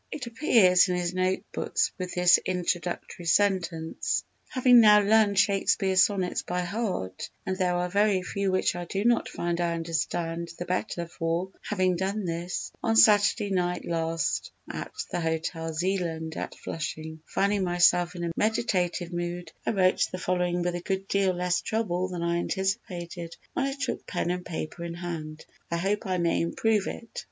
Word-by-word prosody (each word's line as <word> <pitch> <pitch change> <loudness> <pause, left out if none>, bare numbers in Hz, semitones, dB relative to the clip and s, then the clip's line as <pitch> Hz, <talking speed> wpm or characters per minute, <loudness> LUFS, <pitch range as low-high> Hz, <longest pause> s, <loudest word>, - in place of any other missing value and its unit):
It 275 - -5
appears 225 - +4
in 180 - +1
his 175 0 -1
notebooks 185 +1 -1
with 180 -1 -4
this 180 0 +6
introductory 175 -1 -3
sentence: 170 -3 +1 0.3
"_Having 250 -1 +6
now 210 -2 +8
learned 205 -1 +4
Shakespeare's 195 -1 +3
Sonnets 190 -3 +1
by 180 0 -2
heart—and 185 - -4
there 180 -2 +1
are 175 0 0
very 200 0 +2
few 195 +1 -1
which 185 -1 +1
I 175 0 -4
do 195 +4 -3
not 240 0 +3
find 175 0 -2
I 170 -1 0
understand 165 +1 -2
the 175 - -4
better 180 -1 -2
for 170 +3 -2
having 185 -3 0
done 195 +3 -2
this—on 175 +6 -3
Saturday 210 -1 +5
night 180 -2 0
last 165 -1 -1 0.2
at - - -6 0.2
the - - -1
Hotel 165 0 -2
Zeeland 165 -2 -2
at - - -5
Flushing_, 160 0 -5
finding 200 0 +1
myself 175 0 +3
in 175 - -4
a 170 - -1
meditative 185 -5 0
mood, 175 0 -4 0.2
I - - +3
wrote 185 -3 +3
the 185 - -4
following 180 -1 0
with 175 0 0
a 175 - -4
good 195 +1 -3
deal 195 -2 +2
less 180 0 0
trouble 185 -5 -1
than 180 -2 -4
I 170 0 +1
anticipated 175 -3 -3 0.2
when 270 - 0
I 275 - -3
took - - -3
pen 175 -1 -1
and 180 0 -3
paper 165 0 -5
in 170 0 -5
hand. 160 -3 -6 0.2
I 170 - -1
hope 195 +4 -1
I 185 -1 0
may 170 -1 +1
improve 210 +5 +1
it." 230 - -6
180 Hz, 165 wpm, -27 LUFS, 170-195 Hz, 0.3 s, now